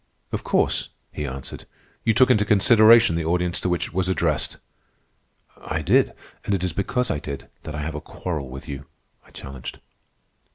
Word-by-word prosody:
"Of - - -3
course," - - +1 0.2
he 75 - -4
answered, 65 +1 -7 0.4
"you 115 -1 +2
took 130 +2 +6
into 105 -4 +4
consideration 110 +1 +6
the 85 - -1
audience 90 +1 +1
to 90 - -1
which 90 -1 0
it - - -19
was 95 0 0
addressed." 95 - 0 1.1
"I - - -2
did, - - +3 0.3
and 100 - 0
it 95 - -3
is 90 -3 -1
because 125 +7 0
I 75 - -1
did 70 -1 -7 0.2
that 75 - -5
I 75 - -3
have 80 +1 -3
a 75 - -5
quarrel 75 -4 -5
with 65 +5 -9
you," 70 -1 -7 0.4
I - - -22
challenged. 65 -2 -8
90 Hz, 180 wpm, -24 LUFS, 75-105 Hz, 1.1 s, took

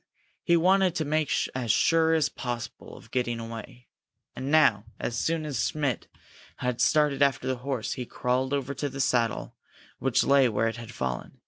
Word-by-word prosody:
He 170 -1 +3
wanted 185 +1 +3
to 160 - -1
make 155 0 0 0.2
as 125 -4 0
sure 165 +4 +3
as 155 -3 +3
possible 120 -4 -6
of - - -16
getting 120 -2 -1
away. 115 +1 -8 0.5
And 130 - -4
now, 115 -9 +4
as 120 - -3
soon 160 +5 -1
as 140 -5 -1
Schmidt 145 -6 -2 0.5
had 125 -1 -2
started 150 -2 +3
after 135 -3 +2
the 130 -1 0
horse, 125 -2 -3
he 125 -2 -6
crawled 130 +2 -1
over 140 -1 -1
to 145 +2 -3
the 135 - -8
saddle, 120 -4 0 0.5
which 135 -1 +2
lay 140 -2 +4
where 115 +1 +1
it 115 - -3
had 115 0 -8
fallen. 65 - -4
130 Hz, 180 wpm, -27 LUFS, 120-150 Hz, 0.5 s, now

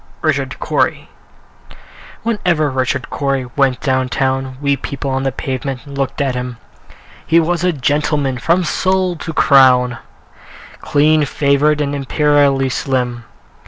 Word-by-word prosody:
Richard - - -1
Cory - - -1 1.1
Whenever 175 -10 0
Richard 130 0 -2
Cory 135 -2 -1
went 135 -3 +1
down 130 -2 0
town, 130 0 -1
We 140 -1 +1
people 140 0 -5
on 130 0 -1
the 135 0 -1
pavement 130 0 -4
looked 140 -1 -4
at 135 -2 0
him: 125 -1 -5 0.7
He 165 - +3
was 170 +1 0
a 180 - +3
gentleman 145 -2 0
from 170 +7 +2
sole 185 +1 0
to 165 - -6
crown, 125 -5 +4 0.8
Clean 150 +1 +2
favored, 145 +2 +1
and 145 -1 -1
imperially 140 -1 +2
slim. 125 -3 -2
140 Hz, 125 wpm, -17 LUFS, 130-150 Hz, 1.1 s, crown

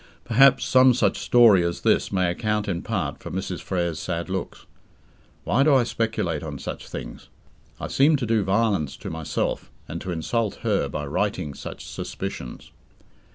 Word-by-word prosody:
Perhaps 135 +4 +5
some 130 -1 +5
such 125 - +1
story 115 -7 +6
as 85 0 -2
this - - +2
may 90 -2 +1
account 105 +2 -1
in 90 -4 -2
part - - -3
for - - -7
Mrs. 95 -1 -4
Frere's 85 -4 -2
sad 85 +1 -4
looks. 95 -2 -5 0.8
Why 130 - +2
do 140 0 +5
I 130 - +5
speculate 110 -10 -2
on 75 -3 -6
such - - -7
things? - - -8 0.5
I - - -4
seem 145 +3 +4
to 135 -4 -1
do 110 -2 +2
violence 95 -7 0
to - - -7
myself 80 -1 -3 0.2
and 85 - -6
to 95 - -4
insult 105 +6 -1
her - - +1
by 75 - -4
writing 90 0 -2
such - - -8
suspicions. 60 - -6
95 Hz, 165 wpm, -24 LUFS, 85-115 Hz, 0.8 s, story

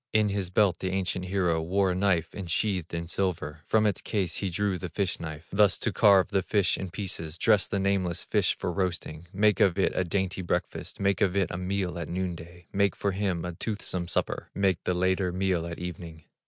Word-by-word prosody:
In 110 -1 +4
his 100 -3 -2
belt 95 0 +3
the 95 - -2
ancient 95 -1 -1
hero 90 -4 +1
Wore 95 +3 +1
a - - -1
knife 90 -4 +1
insheathed 95 -1 -1
with 85 0 -4
silver; 80 -5 -2
From 110 -1 +3
its 105 -3 +1
case 95 -6 -1
he 100 - -1
drew 95 +1 -1
the 90 - -5
fish 95 +1 -1
knife, 80 -1 -7
Thus 100 -1 +4
to 115 - -2
carve 95 -2 +5
the 95 - +1
fish 100 +1 +2
in 95 - -5
pieces, 85 -4 -4
Dress 105 +2 +4
the 100 - -1
nameless 95 -3 0
fish - - +1
for - - -2
roasting, 85 -3 -3
Make 105 +1 +3
of 95 -2 +4
it 95 - +2
a 95 - +1
dainty 95 +1 -1
breakfast, 85 - -3
Make 100 -1 +1
of 95 -2 +2
it 95 -4 +1
a - - -3
meal 90 -1 -2
at 85 - -5
noon 90 0 -2
day, 85 +1 -12
Make 100 0 +2
for 100 - -1
him 95 -3 -1
a 90 - -4
toothsome 90 -2 -3
supper, - - -2
Make 95 -4 +1
the 90 - +1
later 95 0 +1
meal 90 -2 0
at 85 - -6
evening. 85 -3 -7
95 Hz, 215 wpm, -28 LUFS, 85-100 Hz, -, carve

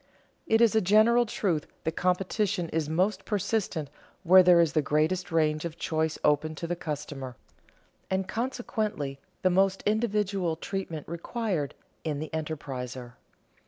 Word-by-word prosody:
_ - - -36 0.4
It 225 +1 +4
is 230 -2 +5
a 220 - +5
general 220 +5 +5
truth 175 -8 -1 0.2
that 160 - 0
competition 185 0 0
is 160 -2 -1
most 185 +4 +1
persistent 200 -6 -1 0.4
where 185 +1 +8
there 180 -1 +6
is 165 -3 +3
the 155 - +3
greatest 155 +6 0
range 155 -2 +2
of 170 -1 -5
choice 160 0 -1
open 150 +1 +2
to 170 - -5
the 175 +1 -2
customer, 145 -5 -5 0.7
and 190 0 0
consequently 215 - -3 0.2
the 185 - +4
most 195 +1 +2
individual 205 -5 0
treatment 165 -3 -5
required 170 - -3 0.3
in 155 -3 -2
the 155 +2 -5
enterpriser. 130 -6 -5
175 Hz, 145 wpm, -28 LUFS, 155-200 Hz, 0.7 s, where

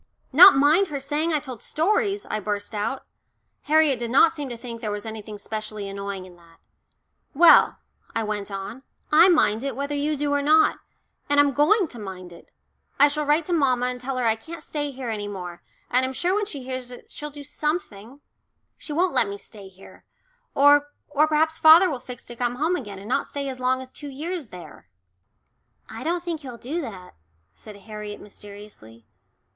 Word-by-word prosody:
"Not 390 - +10
mind 305 +8 +4
her 285 -3 -4
saying 295 +4 -1
I 305 - +2
told 255 -6 -9
stories!" 405 +4 0
I 215 - -2
burst 205 +1 -4
out. 215 +6 -3 0.6
Harriet 300 -4 +3
did 235 -1 -3
not 280 +6 +5
seem 295 -4 -6
to 240 - -6
think 230 -1 -8
there 215 - -3
was 205 0 -5
anything 215 -1 -7
specially 215 0 -5
annoying 200 -1 -6
in 180 -1 -15
that. 170 -1 -21 0.8
"Well," 340 +4 +6 0.4
I 225 - 0
went 210 -1 -4
on, 195 +6 -7 0.3
"I 320 +5 +7
mind 225 - +3
it, 275 -3 -3
whether 280 +2 -3
you 290 +1 -1
do 290 0 -1
or 285 - +1
not. 310 +2 +4 0.5
And 285 0 +3
I'm 285 -1 +4
going 335 - +3
to 240 - -10
mind 185 -3 -8
it. 170 - -16 0.5
I 285 - +7
shall 300 +1 -2
write 300 +2 +2
to 355 - -2
mamma 255 -6 +2
and 250 0 -3
tell 260 +1 -4
her 250 - -1
I 225 -1 +3
can't 325 +10 -10
stay 290 -1 -3
here 260 -3 -5
any 205 -2 -4
more, 180 -4 -7 0.3
and 255 +1 +3
I'm 260 0 -2
sure 350 +7 0
when 415 0 0
she 285 -9 -7
hears 255 -1 -6
it 245 - -13
she'll 300 - -7
do 290 0 -11
something. 285 - -4 0.6
She - - -8
won't 355 +4 +1
let 230 - +3
me 200 - -6
stay 200 -1 -12
here. 190 0 -16 0.5
Or 290 +1 +5 0.2
or 295 +1 +3
perhaps 315 +1 +1
father 330 +3 +7
will 265 - -4
fix 245 -1 -10
to 240 - -9
come 245 0 -2
home 315 +7 0
again 205 - -6
and 195 +2 -10
not 260 +4 0
stay 280 -1 -4
as 260 -1 -7
long 255 +1 0
as 260 - -15
two 290 - -9
years 310 +2 -5
there." 170 - -13 1.0
"I 225 - -8
don't 345 +2 -1
think 340 -3 -3
he'll 255 -4 -9
do 295 +9 -4
that," 195 - -9 0.4
said 210 -2 -12
Harriet 210 +1 -8
mysteriously. 200 - -13
260 Hz, 200 wpm, -24 LUFS, 210-300 Hz, 1.0 s, Not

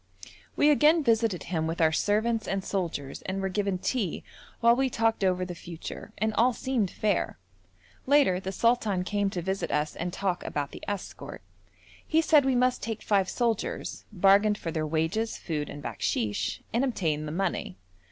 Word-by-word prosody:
We 295 - +5
again 300 +2 +5
visited 225 -6 +2
him 160 -3 -2
with 165 +1 -3
our 160 -1 +4
servants 220 +6 +1
and 195 -1 -1
soldiers 165 -8 -3
and 190 +1 -2
were 195 0 -1
given 195 0 -1
tea 200 -2 -2 0.4
while 235 0 +5
we 265 +1 +1
talked 225 -3 +1
over 185 -1 +2
the 180 - -6
future, 170 -1 -8
and 220 +1 0
all 245 +3 +3
seemed 235 -6 -1
fair. 210 +2 -1 0.7
Later 275 -10 +4
the 190 0 -4
sultan 215 -3 +1
came 205 +1 0
to 180 -3 -4
visit 190 +2 -2
us 150 +1 -1
and 175 +1 -3
talk 185 -1 -2
about 145 -1 -3
the - - -10
escort. 205 -2 -6 0.6
He 320 - +3
said 310 -3 +5
we 265 -1 +2
must 250 0 +2
take 225 -1 -4
five 195 -3 +2
soldiers, 230 -4 -2
bargained 200 +2 +4
for 165 - -4
their 155 -1 -2
wages, 165 +9 -1
food, 150 -4 -3
and 145 0 -8
bakshish, 105 -3 -2
and 235 +3 +2
obtained 160 - -1
the - - -4
money. 175 - -2
195 Hz, 175 wpm, -28 LUFS, 175-230 Hz, 0.7 s, We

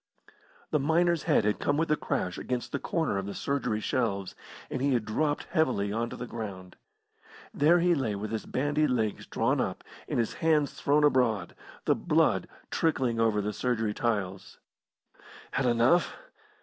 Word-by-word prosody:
The 150 - +2
miner's 165 +3 +2
head 105 - +4
had 105 - +1
come 145 - +1
with 165 0 0
a - - +5
crash 110 -13 -2
against 125 -1 -3
the 140 - -2
corner 160 - -1
of 95 - -5
the 100 - -5
surgery 140 -6 -1
shelves, 100 -5 -1 0.4
and 130 - -2
he 140 0 +2
had 115 -3 -1
dropped 145 +7 0
heavily 105 -10 +1
on 115 +1 -1
to - - -7
the 125 - -5
ground. 100 -6 -7 0.8
There 155 +5 +4
he 175 +1 +3
lay 130 -9 -1
with 105 +2 -5
his 110 - -4
bandy 145 +3 +1
legs 110 -5 -1
drawn - - +1
up - - -3 0.2
and - - -2
his 115 -2 0
hands 155 -3 +2
thrown 145 +1 +2
abroad, 120 -10 +2 0.3
the - - +4
blood - - +2 0.2
trickling 130 -8 +1
over 110 -2 +2
the 105 +1 -2
surgery 110 -2 -1
tiles. 100 -5 -2 0.9
"Had 135 - 0
enough?" 120 +9 +3
125 Hz, 170 wpm, -29 LUFS, 105-145 Hz, 0.9 s, a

